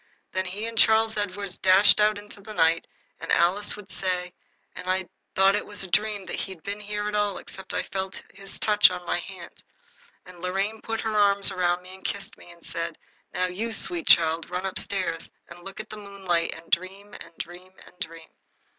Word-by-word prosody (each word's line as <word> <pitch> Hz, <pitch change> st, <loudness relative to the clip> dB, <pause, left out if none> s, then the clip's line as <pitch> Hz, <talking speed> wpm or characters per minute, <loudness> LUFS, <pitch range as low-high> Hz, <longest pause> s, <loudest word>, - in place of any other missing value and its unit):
Then 185 Hz, 0 st, -1 dB
he 200 Hz, +4 st, -4 dB
and 230 Hz, 0 st, -5 dB
Charles 220 Hz, 0 st, +5 dB
Edward 200 Hz, -2 st, -3 dB
dashed 190 Hz, +2 st, +7 dB
out 210 Hz, 0 st, +4 dB
into 205 Hz, 0 st, -12 dB
the 215 Hz, +2 st, -9 dB
night, 165 Hz, 0 st, +3 dB, 0.3 s
as -, -, -7 dB
Alice 190 Hz, +4 st, +3 dB
would 200 Hz, -2 st, -11 dB
say, 180 Hz, -1 st, -2 dB, 0.4 s
and 185 Hz, -, -6 dB
I 185 Hz, -, +3 dB
should -, -, -1 dB
have 185 Hz, -, -13 dB, 0.3 s
thought 195 Hz, +1 st, +5 dB
it 210 Hz, -, -1 dB
was 205 Hz, -1 st, -2 dB
a 185 Hz, -, -7 dB
dream 210 Hz, 0 st, +1 dB
that -, -, -4 dB
he'd 190 Hz, -5 st, -5 dB
been 200 Hz, +1 st, -4 dB
there 210 Hz, 0 st, -3 dB
at 210 Hz, -, -3 dB
all 205 Hz, -1 st, +1 dB
except 190 Hz, 0 st, -11 dB
that -, -, -1 dB
I -, -, +1 dB
felt 190 Hz, 0 st, -4 dB
his 195 Hz, 0 st, -8 dB
touch 210 Hz, -1 st, +6 dB
on 180 Hz, -1 st, -6 dB
my 175 Hz, -, 0 dB
hand. 180 Hz, -1 st, -10 dB, 0.6 s
And 180 Hz, -1 st, -13 dB
Lorraine 195 Hz, +4 st, -1 dB
put 225 Hz, 0 st, -3 dB
her 220 Hz, -1 st, -2 dB
arms 200 Hz, -1 st, +5 dB
round 180 Hz, -1 st, +1 dB
me 185 Hz, +1 st, -11 dB
and 190 Hz, -, -13 dB
kissed 200 Hz, -, -4 dB
me -, -, -16 dB
and 170 Hz, -1 st, -15 dB
said, 165 Hz, 0 st, -4 dB, 0.4 s
"Now, 185 Hz, -, +2 dB
you 200 Hz, +6 st, -3 dB
sweet 340 Hz, +7 st, -1 dB
child, 165 Hz, 0 st, +5 dB
run 180 Hz, +1 st, -3 dB
up 190 Hz, -, +3 dB
stairs 185 Hz, -4 st, 0 dB, 0.2 s
and 175 Hz, 0 st, -12 dB
look 195 Hz, +2 st, -9 dB
at 215 Hz, -, -7 dB
the 215 Hz, -, -7 dB
moonlight 195 Hz, -5 st, -1 dB
and 160 Hz, +1 st, -14 dB
dream 195 Hz, +4 st, -1 dB
and 170 Hz, 0 st, -12 dB
dream 180 Hz, +2 st, -8 dB
and -, -, -16 dB
dream." 165 Hz, -3 st, -7 dB
190 Hz, 215 wpm, -26 LUFS, 180-205 Hz, 0.6 s, dashed